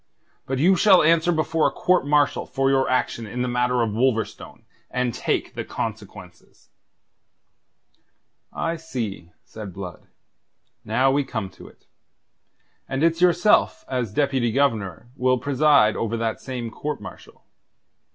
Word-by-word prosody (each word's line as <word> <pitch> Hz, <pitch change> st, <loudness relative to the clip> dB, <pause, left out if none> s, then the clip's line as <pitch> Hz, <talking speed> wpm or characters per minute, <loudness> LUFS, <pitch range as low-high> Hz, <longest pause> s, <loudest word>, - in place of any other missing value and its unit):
But 135 Hz, -, -2 dB
you 180 Hz, +8 st, +4 dB
shall 185 Hz, -1 st, +5 dB
answer 165 Hz, +2 st, +3 dB
before 160 Hz, -1 st, +1 dB
a -, -, -1 dB
court 180 Hz, -5 st, +1 dB
martial 145 Hz, -1 st, +2 dB
for 135 Hz, 0 st, 0 dB
your 135 Hz, -1 st, +2 dB
action 120 Hz, -3 st, -1 dB
in 125 Hz, +4 st, -3 dB
the -, -, -1 dB
matter 125 Hz, 0 st, +1 dB
of 110 Hz, -, -1 dB
Wolverstone, 115 Hz, -1 st, -2 dB, 0.3 s
and 125 Hz, -2 st, -1 dB
take -, -, -2 dB
the -, -, -4 dB
consequences." -, -, -8 dB, 1.8 s
"I 165 Hz, 0 st, -2 dB
see," 115 Hz, -, -6 dB
said 105 Hz, -4 st, -9 dB
Blood. 90 Hz, -3 st, -9 dB, 0.8 s
"Now 135 Hz, +1 st, +2 dB
we 145 Hz, +1 st, +1 dB
come 110 Hz, -7 st, -5 dB
to 95 Hz, -, -14 dB
it. -, -, -20 dB, 1.0 s
And 135 Hz, +3 st, -1 dB
it's 165 Hz, +1 st, +2 dB
yourself 180 Hz, +3 st, +3 dB
as 125 Hz, -5 st, -2 dB
Deputy 135 Hz, -2 st, 0 dB
Governor 115 Hz, -5 st, -1 dB
will 130 Hz, -1 st, +2 dB
preside 140 Hz, -4 st, +3 dB
over 115 Hz, 0 st, -2 dB
that 115 Hz, -1 st, -2 dB
same 125 Hz, -3 st, -5 dB
court 150 Hz, +3 st, -4 dB
martial. -, -, -12 dB
130 Hz, 140 wpm, -23 LUFS, 115-150 Hz, 1.8 s, shall